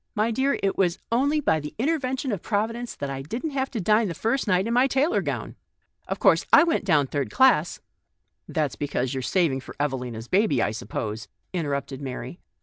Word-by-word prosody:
My 215 Hz, +2 st, +1 dB
dear, 265 Hz, +5 st, +1 dB
it 195 Hz, 0 st, 0 dB
was 180 Hz, -2 st, +2 dB
only 280 Hz, +6 st, +2 dB
by 160 Hz, -, +2 dB
the 150 Hz, 0 st, -8 dB
intervention 265 Hz, -1 st, -1 dB
of 200 Hz, -5 st, -3 dB
Providence 230 Hz, +3 st, -2 dB
that 140 Hz, -1 st, -4 dB
I 135 Hz, 0 st, -4 dB
didn't 235 Hz, -, -4 dB
have 270 Hz, -1 st, -1 dB
to 235 Hz, -, -4 dB
dine 210 Hz, +3 st, +3 dB
the 170 Hz, -, -4 dB
first 230 Hz, -, -1 dB
night 185 Hz, -1 st, +2 dB
in 230 Hz, -, -1 dB
my 250 Hz, +2 st, +4 dB
tailor 275 Hz, +6 st, +2 dB
gown. -, -, -4 dB, 0.5 s
Of -, -, -2 dB
course, -, -, +4 dB
I -, -, +8 dB
went 330 Hz, -10 st, 0 dB
down 155 Hz, -7 st, +3 dB
third 140 Hz, +1 st, -2 dB
class 260 Hz, 0 st, +3 dB, 0.3 s
" -, -, -52 dB
" -, -, -53 dB
That's 150 Hz, -8 st, -1 dB
because 130 Hz, -2 st, -2 dB
you 135 Hz, -, -2 dB
are -, -, -4 dB
saving 155 Hz, -1 st, +1 dB
for 130 Hz, -, -11 dB
Eve 145 Hz, -1 st, 0 dB
lina's 120 Hz, -3 st, -5 dB
baby, 185 Hz, -, +2 dB
I 110 Hz, -, +1 dB
suppose," 110 Hz, -1 st, -5 dB, 0.3 s
interrupted 140 Hz, -5 st, -3 dB
Mary. 130 Hz, +4 st, -6 dB
185 Hz, 215 wpm, -25 LUFS, -, 0.5 s, I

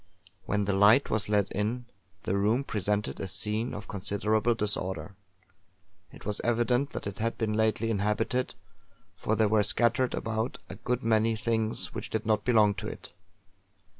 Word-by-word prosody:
When 105 Hz, 0 st, +1 dB
the 100 Hz, -, 0 dB
light 105 Hz, +7 st, +5 dB
was 110 Hz, -1 st, +1 dB
let 100 Hz, -2 st, +2 dB
in, 110 Hz, +5 st, -2 dB, 0.4 s
the 95 Hz, -, -1 dB
room 110 Hz, +7 st, +2 dB
presented 105 Hz, -3 st, -1 dB
a 95 Hz, -, -3 dB
scene 105 Hz, +5 st, +1 dB
of 100 Hz, -, -7 dB
considerable 105 Hz, +3 st, 0 dB
disorder. 95 Hz, -5 st, -2 dB, 1.0 s
It -, -, -14 dB
was 105 Hz, 0 st, -2 dB
evident 120 Hz, +3 st, +1 dB
that -, -, -5 dB
it 100 Hz, -1 st, -5 dB
had 115 Hz, +1 st, -1 dB
been 110 Hz, -2 st, -1 dB
lately 110 Hz, +1 st, +1 dB
inhabited, 110 Hz, +5 st, 0 dB, 0.6 s
for 105 Hz, +3 st, -1 dB
there 110 Hz, 0 st, +3 dB
were 110 Hz, 0 st, +3 dB
scattered 120 Hz, +4 st, +1 dB
about, 110 Hz, +2 st, -2 dB
a -, -, -6 dB
good 125 Hz, +5 st, -2 dB
many 115 Hz, 0 st, +2 dB
things 110 Hz, 0 st, -1 dB
which -, -, -5 dB
did 110 Hz, 0 st, -2 dB
not 110 Hz, -1 st, +2 dB
belong 110 Hz, -4 st, +4 dB
to -, -, -5 dB
it. -, -, -9 dB
110 Hz, 165 wpm, -29 LUFS, 105-115 Hz, 1.0 s, light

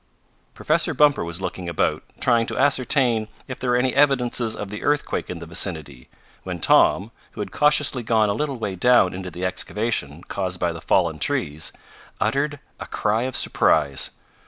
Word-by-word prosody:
Professor -, -, +1 dB
Bumper 145 Hz, -7 st, +4 dB
was 85 Hz, +2 st, -5 dB
looking 90 Hz, -2 st, -4 dB
about, 85 Hz, -, 0 dB, 0.2 s
trying 115 Hz, -2 st, +2 dB
to -, -, -4 dB
ascertain 130 Hz, -4 st, +2 dB, 0.2 s
if 130 Hz, -, -7 dB
there 125 Hz, -, -2 dB
were 120 Hz, -, +3 dB
any 125 Hz, +1 st, +1 dB
evidences 125 Hz, -5 st, +2 dB
of 105 Hz, -1 st, -6 dB
the 105 Hz, -, -6 dB
earthquake 145 Hz, 0 st, -1 dB
in 90 Hz, -, -5 dB
the 85 Hz, -, -8 dB
vicinity, 80 Hz, -6 st, -3 dB, 0.3 s
when -, -, -6 dB
Tom, 100 Hz, +5 st, +3 dB, 0.2 s
who -, -, -12 dB
had -, -, -5 dB
cautiously 150 Hz, -3 st, +2 dB
gone 110 Hz, -2 st, +2 dB
a 100 Hz, -, +1 dB
little 140 Hz, +4 st, -2 dB
way 105 Hz, -4 st, -3 dB
down 120 Hz, -2 st, +4 dB
into 95 Hz, 0 st, -6 dB
the 90 Hz, +2 st, -5 dB
excavation 90 Hz, -4 st, -2 dB
caused 90 Hz, -2 st, -4 dB
by 85 Hz, -, 0 dB
the 85 Hz, -1 st, -8 dB
fallen 85 Hz, -4 st, +1 dB
trees, 75 Hz, +2 st, -1 dB, 0.5 s
uttered 145 Hz, +1 st, 0 dB, 0.2 s
a -, -, -7 dB
cry 110 Hz, +4 st, 0 dB
of 130 Hz, -, -2 dB
surprise. 70 Hz, -3 st, +2 dB
105 Hz, 175 wpm, -23 LUFS, 85-125 Hz, 0.5 s, Bumper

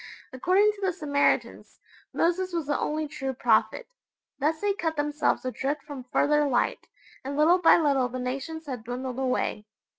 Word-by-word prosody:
According 375 Hz, +10 st, +3 dB
to 410 Hz, -1 st, -14 dB
the 380 Hz, -1 st, 0 dB
Samaritans, 285 Hz, -4 st, 0 dB, 0.3 s
Moses 360 Hz, +2 st, 0 dB
was 335 Hz, -3 st, -1 dB
the 290 Hz, 0 st, -1 dB
only 305 Hz, 0 st, -2 dB
true 270 Hz, -3 st, -4 dB
prophet. 240 Hz, -, +1 dB, 0.5 s
Thus 310 Hz, +3 st, 0 dB
they 410 Hz, -1 st, +1 dB
cut 330 Hz, -6 st, -2 dB
themselves 295 Hz, -2 st, 0 dB
adrift 275 Hz, +3 st, -2 dB
from 280 Hz, -4 st, -9 dB
further 295 Hz, 0 st, +3 dB
light, 245 Hz, -3 st, 0 dB, 0.4 s
and 280 Hz, +2 st, -4 dB
little 335 Hz, +5 st, +5 dB
by 345 Hz, -, +6 dB
little 280 Hz, -6 st, +2 dB
the 255 Hz, -, -5 dB
nations 275 Hz, +6 st, -4 dB
had 255 Hz, -6 st, -6 dB
dwindled 250 Hz, +2 st, -5 dB
away. 250 Hz, -5 st, -1 dB
295 Hz, 160 wpm, -26 LUFS, 260-330 Hz, 0.5 s, by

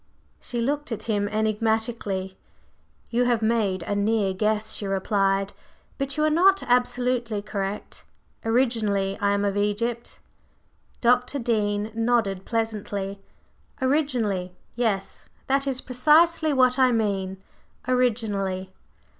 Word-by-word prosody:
She 240 Hz, -, -4 dB
looked 290 Hz, +3 st, -1 dB
at 215 Hz, -1 st, -3 dB
him 205 Hz, -3 st, 0 dB
enigmatically. 215 Hz, -3 st, -1 dB, 0.8 s
"You 245 Hz, +1 st, +2 dB
have 240 Hz, -2 st, +1 dB
made 215 Hz, -5 st, +1 dB
a 205 Hz, -, -2 dB
near 205 Hz, -1 st, +1 dB
guess," 215 Hz, +2 st, 0 dB
she 205 Hz, -, -3 dB
replied; 195 Hz, 0 st, 0 dB, 0.5 s
"but 275 Hz, +1 st, -2 dB
you 305 Hz, -, +2 dB
are 310 Hz, -, +3 dB
not 385 Hz, +3 st, +4 dB
absolutely 245 Hz, -3 st, 0 dB
correct. 200 Hz, -1 st, -5 dB, 0.4 s
Originally, 225 Hz, -5 st, +1 dB
I 200 Hz, -, +2 dB
am 200 Hz, 0 st, 0 dB
of 200 Hz, -1 st, 0 dB
Egypt." 220 Hz, +4 st, -1 dB, 0.8 s
Dr. 250 Hz, +3 st, +2 dB
Dean 215 Hz, -3 st, 0 dB
nodded 225 Hz, -5 st, 0 dB
pleasantly. 205 Hz, -3 st, -3 dB, 0.6 s
"Originally, 245 Hz, -, 0 dB, 0.2 s
yes. 220 Hz, -5 st, -2 dB, 0.2 s
That 275 Hz, +1 st, +1 dB
is 260 Hz, -1 st, -1 dB
precisely 310 Hz, +5 st, +3 dB
what 255 Hz, -1 st, +3 dB
I 255 Hz, -1 st, +5 dB
mean 195 Hz, -4 st, -1 dB, 0.5 s
originally! 205 Hz, -7 st, 0 dB
225 Hz, 115 wpm, -25 LUFS, 200-250 Hz, 0.8 s, I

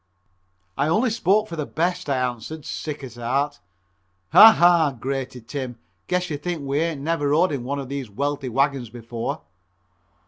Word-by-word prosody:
"I 140 Hz, -, +2 dB
only 220 Hz, +9 st, +2 dB
spoke 215 Hz, -1 st, +2 dB
for 170 Hz, -, -6 dB
the 150 Hz, -3 st, -3 dB
best," 170 Hz, -1 st, -1 dB
I 135 Hz, -, +1 dB
answered, 125 Hz, +4 st, -4 dB
sick 150 Hz, -2 st, -5 dB
at 125 Hz, -4 st, -8 dB
heart. 140 Hz, +5 st, -1 dB, 0.7 s
"Ha! 225 Hz, -, +10 dB
ha!" 170 Hz, -, +4 dB
grated 130 Hz, -2 st, -4 dB
Tim, 130 Hz, -5 st, -5 dB, 0.3 s
"guess 180 Hz, -1 st, -1 dB
you 145 Hz, -, -2 dB
think 170 Hz, -1 st, -4 dB
we 140 Hz, +1 st, -1 dB
ain't 160 Hz, -3 st, -1 dB
never 150 Hz, -1 st, 0 dB
rode 165 Hz, +5 st, +3 dB
in 135 Hz, -4 st, -3 dB
one 140 Hz, +3 st, -3 dB
of 135 Hz, -2 st, -5 dB
these 135 Hz, -3 st, -5 dB
wealthy 140 Hz, +4 st, -2 dB
wagons 135 Hz, -1 st, 0 dB
before." 115 Hz, 0 st, -5 dB
145 Hz, 170 wpm, -23 LUFS, 130-165 Hz, 0.7 s, Ha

